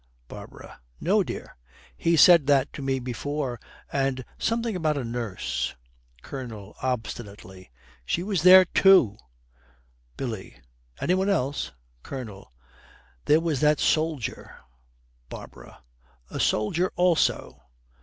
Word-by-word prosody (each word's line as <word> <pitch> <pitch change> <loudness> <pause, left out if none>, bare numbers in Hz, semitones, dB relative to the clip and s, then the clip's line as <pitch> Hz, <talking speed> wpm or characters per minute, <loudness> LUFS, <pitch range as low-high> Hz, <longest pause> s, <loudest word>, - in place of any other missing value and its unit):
BARBARA. - - -11 0.2
'No, - - +2
dear. - - -6 0.4
He 165 - +1
said 165 -2 +7
that 140 -1 +2
to - - -7
me 135 -1 0
before. 130 +1 -4 0.3
And 135 -2 -1
something 230 -2 -1
about 155 -4 0
a 135 - -2
nurse.' 115 - -3 0.5
COLONEL, 110 -7 -8
obstinately, 105 -6 -5 0.3
'She 170 - -2
was 195 -4 -1
there, 185 +1 +9
too.' 170 - +4 1.0
BILLY. 110 - -6 0.4
'Any 180 - +1
one 190 +2 +1
else?' 135 - -1 0.3
COLONEL. 110 - -8 0.7
'There 155 +2 +4
was 160 -5 -1
that 150 0 +3
soldier.' 155 -5 -1 0.7
BARBARA. 65 - -12 0.5
'A - - -5
soldier 170 +13 +1
also!' 175 -1 +1
135 Hz, 110 wpm, -25 LUFS, 115-170 Hz, 1.0 s, there